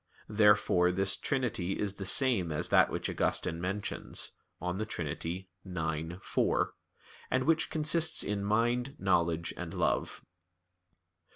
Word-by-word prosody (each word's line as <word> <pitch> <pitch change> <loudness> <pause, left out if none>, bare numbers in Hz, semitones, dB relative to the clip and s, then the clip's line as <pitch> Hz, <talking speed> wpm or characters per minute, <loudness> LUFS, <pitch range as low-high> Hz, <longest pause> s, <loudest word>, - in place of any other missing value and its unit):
Therefore, 105 -4 +4
this 95 +1 +2
trinity 120 - -1
is 100 -2 -2
the 100 -1 -7
same 115 -9 +3
as 75 - -1
that - - +5
which - - -3
Augustine 85 -2 0
mentions 100 +3 -2 0.3
(De 90 +4 -2
Trin. 85 -7 -4
ix, 85 0 -5
4), - - +1 0.6
and 130 0 +1
which 160 +2 +2
consists 160 +1 +3
in 100 -1 -2
mind, 120 +6 0
knowledge, 85 -3 +1
and - - -6
love. - - -1
95 Hz, 120 wpm, -31 LUFS, 90-120 Hz, 0.6 s, that